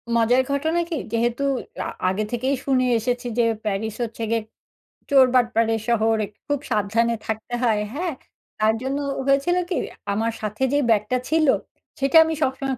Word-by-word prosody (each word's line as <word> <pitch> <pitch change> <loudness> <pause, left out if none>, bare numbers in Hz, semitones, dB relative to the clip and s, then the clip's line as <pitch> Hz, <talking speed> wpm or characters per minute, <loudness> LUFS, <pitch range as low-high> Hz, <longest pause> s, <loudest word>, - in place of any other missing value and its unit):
মজার 240 +3 +4
ঘটনা 315 +5 0
কি? 330 - -2 0.2
যেহেতু 235 +3 0 0.4
আ - - -2 0.2
আগে 205 +3 -1
থেকেই 260 +3 0
শুনে 255 -2 +2
এসেছি 245 +1 -2
যে - - +5 0.2
প্যারিস 210 +1 -2
হচ্ছে 225 0 -5
গিয়ে 230 -1 +1 0.7
চোরবাটপারের 240 -4 +3
শহর, 225 -1 +2
এ - - -11 0.2
খুব 290 -2 0
সাবধানে 230 +2 +1
থাকতে 220 +2 -4
হয়, 215 -3 +2
হ্যাঁ? 340 +1 -2 0.5
তার 215 +1 +3
জন্য 270 +2 -2 0.3
হয়েছিল 275 +6 +2
কি? 355 - -1 0.4
আমার 225 +2 0
সাথে 215 +4 -3
যে 290 - +3
ব্যাগটা 215 +3 +2
ছিল, 315 -2 +3 0.5
সেটা 275 +4 +4
আমি 320 0 -2
সবসময় 270 -1 -1
245 Hz, 155 wpm, -23 LUFS, 225-275 Hz, 0.7 s, যে